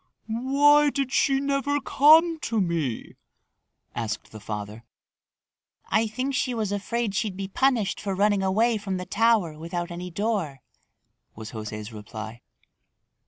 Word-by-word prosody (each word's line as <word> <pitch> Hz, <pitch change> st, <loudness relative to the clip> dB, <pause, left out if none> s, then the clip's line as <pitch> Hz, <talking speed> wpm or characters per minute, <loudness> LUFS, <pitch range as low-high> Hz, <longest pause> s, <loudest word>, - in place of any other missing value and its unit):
"Why 280 Hz, +6 st, +4 dB
did 275 Hz, -2 st, -2 dB
she 270 Hz, 0 st, +3 dB
never 280 Hz, +1 st, 0 dB
come 320 Hz, +4 st, +5 dB
to 230 Hz, -6 st, -1 dB
me?" 165 Hz, -, -2 dB, 0.8 s
asked 110 Hz, -2 st, -4 dB
the 110 Hz, -, -9 dB
father. 105 Hz, +1 st, -6 dB, 1.1 s
"I 220 Hz, +1 st, +2 dB
think 255 Hz, +5 st, -3 dB
she 255 Hz, -1 st, 0 dB
was 215 Hz, -3 st, -2 dB
afraid 210 Hz, +2 st, -2 dB
she'd 200 Hz, -2 st, -2 dB
be 195 Hz, -1 st, -4 dB
punished 235 Hz, -1 st, +1 dB
for 195 Hz, -2 st, -2 dB
running 205 Hz, 0 st, +2 dB
away 220 Hz, +5 st, +2 dB
from 195 Hz, -2 st, -3 dB
the 180 Hz, -, -5 dB
tower 210 Hz, -9 st, +2 dB
without 175 Hz, +2 st, -4 dB
any 175 Hz, +1 st, -6 dB
door," 180 Hz, -, -2 dB, 0.7 s
was 110 Hz, 0 st, -8 dB
José's 105 Hz, 0 st, -6 dB
reply. 110 Hz, +2 st, -8 dB
205 Hz, 135 wpm, -25 LUFS, 155-255 Hz, 1.1 s, come